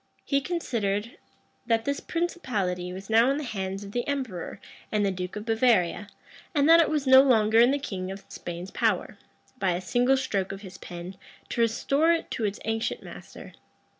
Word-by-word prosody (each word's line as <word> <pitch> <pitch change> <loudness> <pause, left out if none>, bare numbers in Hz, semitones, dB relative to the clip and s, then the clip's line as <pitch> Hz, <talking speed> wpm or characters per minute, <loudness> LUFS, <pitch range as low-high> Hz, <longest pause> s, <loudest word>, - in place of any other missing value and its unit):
He 280 -1 +1
considered, 230 - -2 0.5
that 225 -1 +1
this 280 0 -1
principality 210 - -2
was 190 +2 -8
now 230 +3 +5
in 275 - +1
the 300 - -3
hands 195 -5 -4
of 200 - -9
the 240 +2 -2
emperor 255 -11 -4 0.3
and 210 -1 +1
the 195 - +1
duke 180 -1 -5
of 210 0 -6
Bavaria 225 -5 +2 0.5
and 285 0 +4
that 330 +1 +8
it 325 - +2
was 300 -2 0
no 260 0 +9
longer 225 -4 +4
in 240 +1 +7
the 280 - +2
king 190 -10 -5
of 195 +1 -8
Spain's 175 +2 -7
power, - - 0 0.4
by 185 -2 +1
a 175 - -2
single 245 +8 +2
stroke 200 -8 -1
of 195 0 -7
his 190 -2 -11
pen, 175 +2 -8 0.3
to 235 - -1
restore 275 +8 +2
it 335 - -3
to 225 - -1
its 205 0 -2
ancient 225 0 -2
master. - - -11
225 Hz, 190 wpm, -27 LUFS, 195-265 Hz, 0.5 s, no